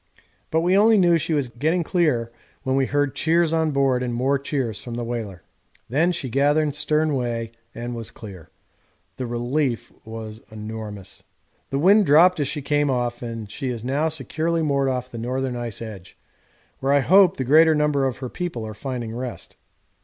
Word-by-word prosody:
But 160 - +1
we 180 +3 +3
only 215 +2 +6
knew 175 -3 +4
she 160 +1 -1
was 140 -3 0
getting 155 +9 0
clear 150 -10 +1 0.3
when 130 -1 0
we 135 -1 +2
heard 145 -1 0
cheers 165 +2 +2
on 160 -1 +2
board 135 -3 +2
and 120 -2 -2
more 135 +3 +1
cheers 135 -6 -3
from 120 -2 -6
the 120 - -3
whaler. 110 -6 -5 0.5
Then 160 +8 +2
she 155 -6 -3
gathered 145 +3 +2
stern 150 +1 0
way 120 -3 -2 0.2
and 120 +1 -5
was 115 -2 -5
clear. 95 -7 -11 0.7
The 130 - -3
relief 120 +2 -1
was 110 0 -8
enormous. 105 -3 -7 0.5
The 135 - -1
wind 195 +7 +5
dropped 170 +4 +6
as 145 - 0
she 145 - -4
came 145 0 +1
off, 120 -2 -1
and 115 -3 -6
she 135 - -4
is 120 -2 -5
now 145 +5 +1
securely 160 +2 -1
moored 140 -2 +1
off 125 -1 -3
the 115 - -6
northern 130 +2 -2
ice 120 -2 -5
edge, 100 -5 -10 0.6
where 135 +1 +1
I 145 - +4
hope 190 +5 +5
the 130 - -1
greater 155 +4 +5
number 150 -2 +2
of 130 - -4
her 130 - -5
people 165 -10 -4
are 110 - -6
finding 120 0 -5
rest. 125 0 -6
135 Hz, 185 wpm, -23 LUFS, 120-155 Hz, 0.7 s, only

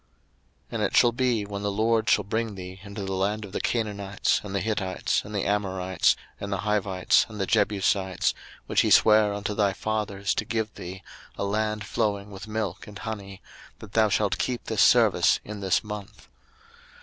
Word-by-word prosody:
02:013:005 - - -40 0.6
And - - -2
it - - +1
shall 120 - +6
be 120 -3 0
when 100 0 -5
the 100 0 -1
LORD 110 +2 +1
shall - - +4
bring 110 +1 -2
thee 95 0 -8
into 100 0 -7
the 95 - -3
land 105 +3 -1
of 100 - -11
the - - -3
Canaanites, 100 -4 0
and 100 -1 -6
the - - +2
Hittites, 95 -2 -1
and 105 - -8
the 100 - -1
Amorites, 95 -3 +1 0.2
and 100 - -5
the 100 -2 -1
Hivites, 100 -3 +2
and 105 -1 -9
the 95 - +1
Jebusites, 100 -3 +1 0.3
which - - +2
he - - +1
sware 105 -1 +6
unto 100 0 -3
thy 100 -2 +2
fathers 100 -2 -2
to - - -1
give 110 0 -2
thee, 95 +1 -8 0.3
a - - -2
land 105 +1 -1
flowing 105 -2 -1
with 100 +2 -9
milk 105 -4 -3
and 105 -1 -9
honey, 100 -3 -7 0.3
that 110 -2 -12
thou 110 -1 +4
shalt 105 0 +1
keep 125 -2 -2
this - - 0
service - - +5
in 105 0 -7
this 95 -2 +1
month. 105 -2 -8
105 Hz, 190 wpm, -26 LUFS, 95-110 Hz, 0.6 s, shall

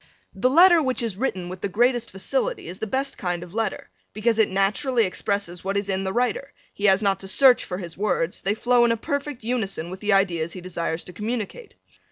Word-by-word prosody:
The 205 +7 +1
letter 345 +4 +7
which 260 -4 0
is 225 -5 -2
written 190 -6 -2
with 180 0 -8
the 200 - -2
greatest 240 +3 +1
facility - - -2
is 180 +2 -8
the 220 - -3
best 270 +4 -2
kind 175 -2 -2
of 175 0 -12
letter 220 -2 -3 0.2
because 225 +2 0
it 220 - +4
naturally 215 +6 +1
expresses 185 -1 -3
what 195 +1 -1
is 200 0 -2
in 190 0 -1
the 190 - -1
writer, 250 +5 -1 0.2
he 200 - -3
has 195 +1 +4
not 195 -1 +2
to 195 - -8
search 255 +5 +5
for 180 - -5
his 175 -2 -8
words, 185 -4 -1
they 200 +2 0
flow 245 +1 +3
in 235 - +4
a 230 - +1
perfect 285 +1 -4
unison 200 -8 -2
with 185 - -7
the 210 0 +1
ideas 170 -4 +1
he 185 - -8
desires 170 -2 -3
to 180 - -11
communicate. 230 - -5
205 Hz, 225 wpm, -24 LUFS, 190-245 Hz, 0.2 s, letter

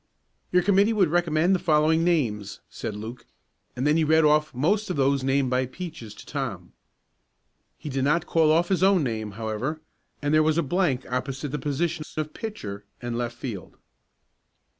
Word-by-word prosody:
"Your 180 0 +4
committee 200 +3 +4
would 195 -7 +3
recommend 170 +1 +2
the 185 - +2
following 160 0 +3
names," 115 - 0
said 105 - -5
Luke, 115 +3 -8 0.5
and 125 +2 -2
then 150 +2 +4
he 165 - +3
read 160 +1 +4
off 150 0 +3
most 195 - 0
of 180 - -1
those 140 -1 +2
named 135 -1 +1
by 130 0 +1
Peaches 130 - -8
to - - -13
Tom. 115 - -5 1.0
He - - -9
did 135 -2 -1
not 155 +4 +2
call 160 -3 +3
off 170 +2 +2
his 190 -2 +1
own 190 -3 +4
name, 110 -4 -3
however, 110 +8 -3 0.4
and 145 0 -1
there 155 - +6
was 155 +1 +2
a 170 - +2
blank 145 -4 0
opposite 130 +2 -3
the 150 +2 -3
positions 150 +3 -2
of 155 -1 -3
pitcher 105 - -6 0.2
and 120 -1 -4
left 120 0 -3
field. 110 -9 -7
150 Hz, 180 wpm, -25 LUFS, 125-165 Hz, 1.0 s, there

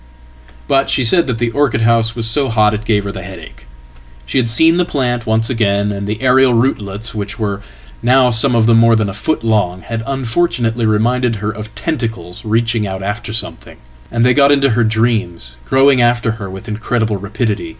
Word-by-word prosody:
"But 135 0 +2
she 135 - +2
said 165 +8 +3
that 125 -3 -2
the 115 0 -1
orchid 130 -5 0
house 115 0 +2
was 115 -2 -3
so 135 +4 0
hot 110 -2 +2
it 105 0 -4
gave 105 -2 +1
her 100 - -4
the 95 - -8
headache. 65 -9 -11 0.6
She 95 - 0
had 120 -2 0
seen 160 +9 +4
the 180 - +3
plant 125 -8 -2
once 110 +1 +1
again, 105 -4 0
and 100 0 -5
the 105 +3 -4
aerial 130 -1 +4
rootlets, 110 -4 -2
which 105 -1 -5
were 105 -3 -3 0.4
nowsome 125 0 +3
of 115 -1 +3
them 115 0 +4
more 115 0 +5
than 110 -2 0
a - - -6
foot 110 +6 -2
long, 100 -5 0
had 115 -1 -5
unfortunately 120 -4 -1
reminded 115 +3 +1
her 105 0 -4
oftentacles 110 - -5
reaching 115 -1 0
out 95 0 -5
after 105 +2 -4
something; 110 - -4 0.3
and 115 +1 0
they 125 - +4
got 140 0 +4
into 140 -2 +3
her 120 +1 +2
dreams, 110 - -1
growing 135 -1 +3
after 120 -1 +1
her 105 -4 -7
with 95 +5 -10
incredible 110 0 -2
rapidity. 105 +2 -3
115 Hz, 190 wpm, -15 LUFS, 105-125 Hz, 0.6 s, more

